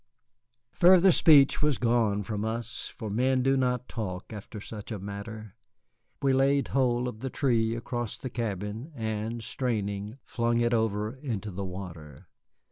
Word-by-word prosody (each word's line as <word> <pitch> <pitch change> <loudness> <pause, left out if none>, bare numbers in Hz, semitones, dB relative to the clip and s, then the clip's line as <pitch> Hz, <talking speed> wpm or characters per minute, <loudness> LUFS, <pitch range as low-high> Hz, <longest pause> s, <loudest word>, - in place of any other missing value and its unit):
Further 185 +1 +6
speech 145 -4 +6
was 150 -3 +2
gone 115 -4 +2
from 105 -1 -3
us, 115 +1 -3
for 110 -4 -7
men 130 +4 +2
do 135 +1 +3
not 125 -2 0
talk 100 -2 -5
after 105 +1 -8
such 105 +1 -8
a 110 - -2
matter. 100 +1 -7 0.7
We 135 -1 +4
laid 135 +1 +2
hold 125 -2 +1
of 110 -3 -6
the 130 +3 -4
tree 115 -5 +1
across 120 -1 -4
the 130 - -6
cabin 110 - -4
and, 110 0 -3
straining, 105 -2 -2
flung 120 0 0
it 120 0 +2
over 110 -1 0
into 110 -7 -4
the 95 +2 -4
water. 85 -4 -8
115 Hz, 150 wpm, -28 LUFS, 105-125 Hz, 0.7 s, Further